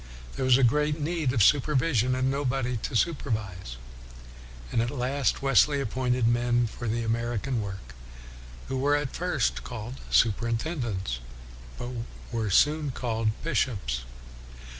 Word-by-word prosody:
There 130 - -1
was 130 -1 +6
great 150 +4 +2
need 155 -3 0
of 115 -5 +3
supervision 130 - +3
and 130 +1 +1
nobody 135 -2 -1
to 110 - -5
supervise. 110 - -1 0.9
And 115 - +2
at 120 - 0
last 135 0 -1
Wesley 140 +2 +4
appointed 125 -1 0
men 120 0 +2
for 120 +2 -6
the 115 +2 -1
American 115 +2 -1
work, 95 -12 -7 0.7
who 135 - -2
were 145 +2 +3
at 145 -2 -2
first 175 -8 0
called 120 +1 -7
superintendents, 115 - 0 0.6
but 120 - -5 0.4
were 115 -3 -1
soon 150 +8 +3
called 115 -3 -1
bishops. 130 - -1
125 Hz, 125 wpm, -27 LUFS, 115-140 Hz, 0.9 s, was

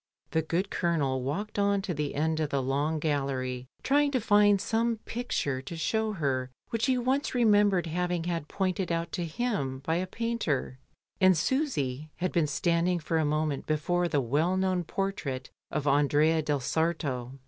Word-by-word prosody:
The 160 - +2
good 170 +5 -1
Colonel 145 -7 0
walked 200 +12 -3
on 200 -1 +2
to 190 -3 -2
the 150 -2 -3
end 160 +2 0
of 155 -2 0
the 140 -2 0
long 145 +4 0
gallery 135 -4 -2 0.2
trying 290 +1 +3
to 255 - +3
find 205 -2 +4
some 230 +3 0
picture 145 - -2
to 165 +5 -7
show 220 +6 0
her 135 -7 -1 0.2
which 230 +1 0
he 260 -1 +3
once 260 +3 0
remembered 205 -6 +4
having 175 +1 -1
had 170 -3 -2
pointed 185 -1 -1
out 170 0 -1
to 175 - -2
him 160 - -2
by 160 +1 +1
a 185 +1 -2
painter, 185 - -2 0.4
and 185 -3 +5
Susy 155 - -1
had 185 +1 -2
been 165 -4 +2
standing 170 +3 +1
for 165 0 -1
a 155 - +2
moment 150 -1 -1
before 175 +4 +1
the 145 -4 +1
well 155 +9 +1
known 185 -1 +1
portrait 155 -10 -3 0.2
of 150 -2 -2
"Andrea 145 +3 +3
del 145 -2 -1
Sarto." 140 -5 -1
165 Hz, 170 wpm, -29 LUFS, 145-195 Hz, 0.4 s, and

